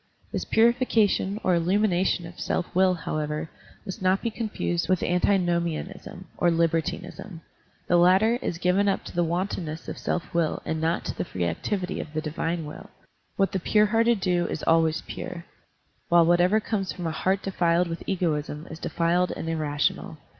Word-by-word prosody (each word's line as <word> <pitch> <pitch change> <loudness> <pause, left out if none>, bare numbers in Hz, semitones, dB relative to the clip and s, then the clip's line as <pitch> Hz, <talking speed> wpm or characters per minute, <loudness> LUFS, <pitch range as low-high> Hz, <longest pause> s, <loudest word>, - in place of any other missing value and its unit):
This - - -3
pxirification 225 -4 +2
or 185 - +3
illtunination 180 0 +1
of 170 - -13
self 175 - -2
will, 185 0 +4
however, 155 -1 -3 0.3
must 190 -2 -6
not 185 +1 +2
be 230 - -1
confused 215 -7 -2
with 185 -2 +2
antinomi 175 -2 +2
anism 180 +3 -8 0.2
or 175 - +4
libertinism. 165 +2 -1 0.5
The 175 - +4
latter 190 +7 +4
is 170 - -2
given 185 +4 +2
up 195 - -1
to - - -9
the 175 - +2
wantonness 170 -2 -3
of - - -6
self 180 +1 -3
will 170 -2 +1
and 160 0 -2
not 165 +1 0
to - - -3
the - - -2
free 90 - -3
activity 180 - -2
of 150 - -7
the - - +1
divine 165 +1 -3
will. 150 - -9 0.5
What 195 -1 +1
the 190 - -1
pure 210 +4 +3
hearted 230 0 +2
do 175 -2 +1
is - - -4
always 165 -1 +2
pure, 170 -1 -7 0.6
while 170 -1 +6
whatever 175 +5 +4
comes 205 -3 -2
from 180 - -6
a 165 - 0
heart 190 +4 0
defiled 175 -2 +1
with 165 0 -5
egoism 155 -5 -1
is 160 - -8
defiled 175 +2 +1
and - - -5
irrational. 155 -1 -1
175 Hz, 175 wpm, -26 LUFS, 165-190 Hz, 0.6 s, while